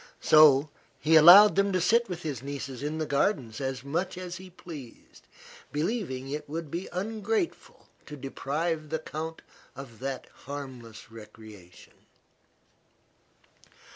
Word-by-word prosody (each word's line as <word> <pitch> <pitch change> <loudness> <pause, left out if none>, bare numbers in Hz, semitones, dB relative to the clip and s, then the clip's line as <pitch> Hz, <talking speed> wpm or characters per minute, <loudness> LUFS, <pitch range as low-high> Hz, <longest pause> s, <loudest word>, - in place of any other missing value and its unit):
So 150 -1 +6 0.3
he 160 +2 +3
allowed 190 +6 +9
him 200 0 +2
to 185 - +2
sit 230 +6 +2
with 175 -1 -6
his 145 -7 -4
nieces 135 -2 -6
in 150 +2 -3
the 160 - -2
gardens 140 - -1
as 130 -1 -4
much 170 +7 -3
as 180 -1 -6
he 185 0 -12
pleased, 160 -8 -12 0.4
believing 150 - -3
it 150 0 -5
would 160 -1 -5
be 175 +3 -5
ungrateful 220 - -3 0.2
to 150 - -8
deprive 155 +4 -3
the 160 - -1
count 160 +1 -7 0.3
of 130 -5 -11
that 135 0 -5
harmless 130 -6 -9
recreation. 105 -5 -14
155 Hz, 130 wpm, -28 LUFS, 135-175 Hz, 0.4 s, allowed